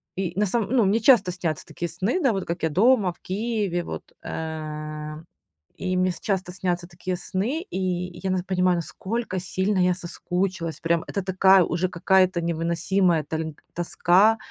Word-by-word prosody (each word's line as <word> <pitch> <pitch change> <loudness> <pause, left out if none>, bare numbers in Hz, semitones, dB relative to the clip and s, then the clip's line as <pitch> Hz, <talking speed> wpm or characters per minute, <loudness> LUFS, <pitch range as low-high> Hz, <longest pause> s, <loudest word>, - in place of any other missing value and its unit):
и 185 -3 -2
на 210 - +4
самом 220 +2 -1
ну, 245 -5 +4
мне 205 +4 +3
часто 215 -6 +5
снятся 170 -4 -3
такие 170 - -5
сны, 235 - -1
да, 265 - +4
вот 195 -2 -2
как 170 0 -4
я 160 - +2
дома, 205 - +4
в - - -31
Киеве, 205 -3 -1
вот. - - -6 0.2
Э, 155 -1 -5 0.6
и 185 -1 -1
мне 185 0 +2
с 175 - -9
часто 190 -3 -2
снятся 180 -2 -2
такие 180 +1 -4
сны, 215 - -2
и 190 - -5 0.4
я 190 - 0
нас 185 -1 0
понимаю, 180 -1 +2
насколько 190 +4 -3
сильно 190 +3 -1
я 180 0 +4
соскучилась 180 -2 -3
прям, 165 0 +1
это 200 - -2
такая 190 0 +5
уже 180 +2 -1
какая-то 185 +1 +3
невыносимая 170 +1 +1
тольг 160 0 -4
тоска, 180 +5 +3
185 Hz, 170 wpm, -25 LUFS, 170-195 Hz, 0.6 s, часто